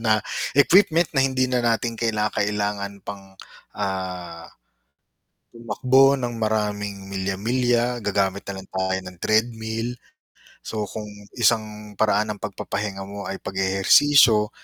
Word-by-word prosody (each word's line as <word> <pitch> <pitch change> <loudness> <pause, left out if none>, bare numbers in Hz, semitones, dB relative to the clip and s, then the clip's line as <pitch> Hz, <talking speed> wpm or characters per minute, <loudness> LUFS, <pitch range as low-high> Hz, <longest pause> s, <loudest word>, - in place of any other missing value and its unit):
na 110 -2 +3 0.4
equipment 170 +2 +5
na - - +5
hindi 130 -1 +1
na 125 -1 +1
natin 115 0 0
kinakailangan 105 -2 -1
pang, 100 -1 -7 0.5
ah, 90 -4 -4 1.1
tumakbo 130 +4 +3
ng 120 -1 -3
maraming 105 -2 -2
milya-milya 120 +5 0
gagamit 100 -1 0
na 100 - -4
lang 95 - -15
tayo 95 0 0
ng 95 -1 -9
treadmill. 110 +1 0 0.8
So 105 -2 -3
kung 105 -1 -6 0.3
isang 105 -2 0
paraan 105 0 +2
ng - - -20
pagpapahinga 100 -1 -4
mo 100 0 -7
ay 95 - -4
pag-eehersisyo 105 +4 +4
105 Hz, 115 wpm, -23 LUFS, 100-120 Hz, 1.1 s, equipment